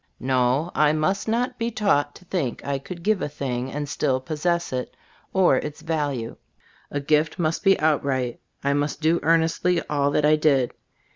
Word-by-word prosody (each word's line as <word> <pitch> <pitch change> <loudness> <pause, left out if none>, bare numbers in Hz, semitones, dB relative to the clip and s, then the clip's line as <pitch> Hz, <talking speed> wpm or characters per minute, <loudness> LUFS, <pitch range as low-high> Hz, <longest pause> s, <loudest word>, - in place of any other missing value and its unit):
"No," 130 +5 +1
I 150 0 +3
must 190 +7 0
not 245 +3 -1
be 230 0 0
taught 145 -10 +1
to 180 - -15
think 160 -11 -3
I 140 -1 -1
could 170 +4 -9
give 210 -1 +2
a - - -2
thing 130 -2 -3
and 145 0 -3
still 135 -2 0
possess 165 +4 -1
it, 125 -1 -4 0.3
or 185 -8 +4
its 150 +2 -5
value. 145 -8 -2 0.5
A 145 - -2
gift 150 +3 +1
must 165 -2 -1
be 195 -1 +4
outright. 140 -5 0 0.2
I 140 0 +2
must 145 +1 -1
do 165 +2 +2
earnestly 165 +2 +2
all 140 -1 +2
that 150 +1 +1
I 155 +1 +5
did. 140 -5 +2
150 Hz, 180 wpm, -24 LUFS, 140-170 Hz, 0.5 s, I